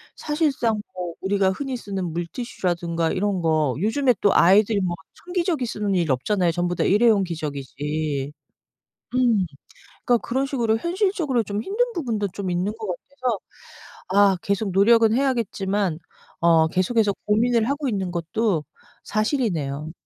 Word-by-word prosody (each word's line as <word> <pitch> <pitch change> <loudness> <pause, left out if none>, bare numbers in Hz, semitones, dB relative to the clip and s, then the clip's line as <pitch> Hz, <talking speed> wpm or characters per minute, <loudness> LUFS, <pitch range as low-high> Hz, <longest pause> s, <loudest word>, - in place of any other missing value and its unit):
사실상 285 -8 0
뭐 180 -2 -4
우리가 195 0 +1
흔히 265 +7 -3
쓰는 195 -7 -4
물티슈라든가 170 -2 -2
이런 195 -1 0
거 155 -5 +1
요즘에 250 +5 +2
또 200 - +4
아이들이 205 +4 +5
뭐 180 -3 -1 0.3
천기저귀 350 -6 -1
쓰는 210 -3 -2
일이 170 -5 +1
없잖아요. 175 +7 +1
전부다 175 0 -1
일회용 210 -1 +4
기저귀지. 150 -2 -3 0.8
음. 235 -7 +3 0.6
그러니까 240 -1 +3
그런 260 +4 -1
식으로 240 -5 0
현실적으로 340 - 0
좀 205 +1 -3
힘든 430 - 0
부분도 225 - -1
좀 195 -2 -3
있는 180 +4 -1
것 220 -2 -6
같아서 250 +5 -3 0.7
아 195 0 +4
계속 200 0 -1
노력은 220 +3 +5
해야겠지만 205 - 0 0.4
어 165 -1 +4
계속해서 200 +4 +1
고민을 225 +2 +2
하고 285 0 -1
있는 195 -5 -2
것도 175 0 -1 0.4
사실이네요. 175 - -1
205 Hz, 325 characters per minute, -23 LUFS, 175-240 Hz, 0.8 s, 아이들이